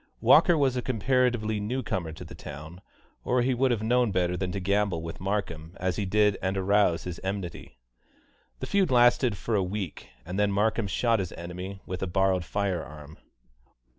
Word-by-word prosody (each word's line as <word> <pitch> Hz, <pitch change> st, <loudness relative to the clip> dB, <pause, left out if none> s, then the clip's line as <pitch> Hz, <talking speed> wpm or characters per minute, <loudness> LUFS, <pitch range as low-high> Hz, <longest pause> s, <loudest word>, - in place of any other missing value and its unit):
Walker 175 Hz, -2 st, +6 dB
was 135 Hz, -3 st, +2 dB
a 125 Hz, -, -1 dB
comparatively 120 Hz, -3 st, +1 dB
new 125 Hz, +6 st, -2 dB
comer 85 Hz, -4 st, -3 dB
to 80 Hz, -, -9 dB
the -, -, -11 dB
town, 80 Hz, +6 st, -9 dB, 0.4 s
or 125 Hz, 0 st, +1 dB
he 130 Hz, +1 st, +1 dB
would 130 Hz, +2 st, +2 dB
have 115 Hz, -3 st, 0 dB
known 120 Hz, 0 st, +2 dB
better 90 Hz, -1 st, 0 dB
than 90 Hz, 0 st, -2 dB
to 100 Hz, -, -3 dB
gamble 100 Hz, -3 st, 0 dB
with 85 Hz, 0 st, -7 dB
Markham 95 Hz, -4 st, -3 dB
as 95 Hz, -1 st, -1 dB
he 100 Hz, -, -1 dB
did 105 Hz, +1 st, +2 dB
and 95 Hz, +1 st, -1 dB
arouse 95 Hz, -3 st, +2 dB
his 90 Hz, -2 st, -6 dB
enmity. 95 Hz, -9 st, -5 dB, 0.8 s
The -, -, -2 dB
feud 195 Hz, -4 st, +2 dB
lasted 120 Hz, -2 st, +4 dB
for 115 Hz, -, -3 dB
a 105 Hz, -, +3 dB
week, 95 Hz, -2 st, -4 dB, 0.2 s
and 90 Hz, +4 st, -4 dB
then 105 Hz, -1 st, +2 dB
Markham 105 Hz, +2 st, +1 dB
shot 115 Hz, +3 st, +1 dB
his 95 Hz, -3 st, -4 dB
enemy 90 Hz, +3 st, -7 dB
with 90 Hz, -, -5 dB
a 95 Hz, -, -1 dB
borrowed 95 Hz, 0 st, +1 dB
fire 95 Hz, -3 st, -1 dB
arm. 75 Hz, +1 st, -12 dB
100 Hz, 190 wpm, -27 LUFS, 90-115 Hz, 0.8 s, Walker